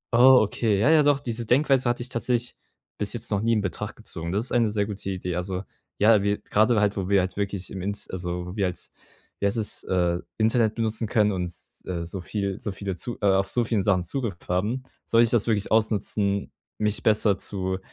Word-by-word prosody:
Oh, 130 +2 +8
okay, 105 0 0
ja, 130 +9 +4
ja, 160 -1 +6
doch, 145 -1 +3
diese 120 -3 -3
Denkweise 135 -1 +3
hatte 120 0 -1
ich 125 - -5
tatsächlich 120 0 -1 0.4
bis 100 -1 -1
jetzt 115 -2 -2
noch 100 - +1
nie 115 +1 +2
in 110 - +2
Betracht 95 -4 -4
gezogen. 85 +1 -6
Das 105 +5 -1
ist - - -6
eine 115 -3 +3
sehr 105 -1 0
gute 100 -1 -6
Idee. 90 -2 -3
Also, 90 +1 -3 0.3
ja, 105 -1 +5
wir 100 0 +1
grade 110 +2 +2
halt, 105 -1 +2
wo 95 0 -2
wir 100 -1 +5
halt 95 0 -2
wirklich 100 -2 -3
im 95 -1 -5
Int 100 +2 -3
also, 90 -1 -4
wo 90 - -7
wir 100 -3 +1
halt 90 -1 -5 0.5
wie 100 - +2
heißt 100 - -1
es, 110 - -3
äh, 90 -1 +1 0.2
Internet 110 0 +2
benutzen 110 -1 -1
können 105 -1 +3
und, 90 -2 -2 0.3
äh, 85 -2 -3
so 90 +2 -6
viel 100 0 -3
so 105 -5 -3
viele 95 -1 -4
zu 120 +7 -6
äh, - - 0
auf 95 0 +3
so 120 - +1
vielen 110 -3 0
Sachen 95 -2 +2
Zugriff 105 0 -3
haben, 105 +9 -1 0.2
sollte 115 +1 +5
ich 115 - +2
das 120 -2 +2
wirklich 105 -2 0
ausnutzen, 105 -2 +1 0.3
mich 105 -1 0
besser 105 -2 +3
zu 95 -1 -3
105 Hz, 225 wpm, -25 LUFS, 95-115 Hz, 0.5 s, Oh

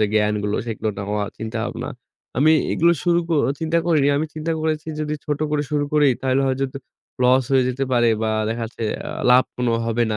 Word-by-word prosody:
যে 105 - +4
জ্ঞানগুলো 105 -1 +1
সেগুলো 110 -1 -3
নেওয়া, 105 +1 -2
চিন্তাভাবনা। 110 +2 -4 0.5
আমি 155 +4 +5 0.2
এগুলো 170 +1 +4
শুরু 170 -1 +3
ক - - -9 0.3
চিন্তা 165 +1 +1
করিনি। 155 -5 +3
আমি 155 +2 0
চিন্তা 160 +1 -2
করেছি 155 0 -1
যদি 150 0 -2
ছোট 150 -1 -2
করে 150 -1 +1
শুরু 145 -1 +1
করি 150 -1 +5
তাহলে 130 +1 +1
হয়তো 135 0 -1 0.5
loss 130 +1 +4
হয়ে 130 -1 +4
যেতে 130 +2 -1
পারে 120 -1 +4
বা 110 - +1 0.2
দেখা 115 +1 -3
যাচ্ছে 115 0 -9
এ্যা - - -6 0.2
লাভ 125 +1 +6
কোনো 125 -1 0
হবে 115 +1 +1
না। - - -1
130 Hz, 195 wpm, -21 LUFS, 115-150 Hz, 0.5 s, লাভ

